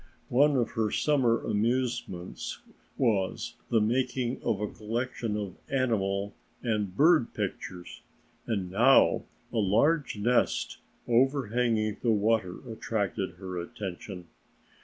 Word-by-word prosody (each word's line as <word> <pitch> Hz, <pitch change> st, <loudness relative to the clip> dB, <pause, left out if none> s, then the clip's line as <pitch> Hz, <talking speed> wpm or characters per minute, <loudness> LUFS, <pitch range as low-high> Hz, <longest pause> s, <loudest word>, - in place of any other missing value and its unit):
One 140 Hz, +3 st, +4 dB
of 120 Hz, -3 st, +1 dB
her 110 Hz, -1 st, 0 dB
summer 125 Hz, -3 st, +2 dB
amusements 115 Hz, -5 st, -2 dB, 0.3 s
was 105 Hz, -7 st, 0 dB, 0.2 s
the 115 Hz, -, +4 dB
making 125 Hz, +2 st, 0 dB
of 100 Hz, -, 0 dB
a 105 Hz, -, -1 dB
collection 115 Hz, 0 st, -3 dB
of 100 Hz, -3 st, -5 dB
animal 100 Hz, -7 st, 0 dB, 0.3 s
and 105 Hz, -5 st, -1 dB
bird 155 Hz, -4 st, +4 dB
pictures, 90 Hz, -1 st, -5 dB, 0.5 s
and 95 Hz, -5 st, -2 dB
now 120 Hz, +8 st, +5 dB, 0.3 s
a -, -, -1 dB
large 115 Hz, -, +2 dB
nest 120 Hz, +4 st, +1 dB, 0.3 s
overhanging 120 Hz, -4 st, +2 dB
the 120 Hz, -, +1 dB
water 105 Hz, -3 st, +1 dB
attracted 105 Hz, -4 st, -2 dB
her 90 Hz, -1 st, -5 dB
attention. 90 Hz, 0 st, -6 dB
110 Hz, 110 wpm, -29 LUFS, 100-125 Hz, 0.5 s, now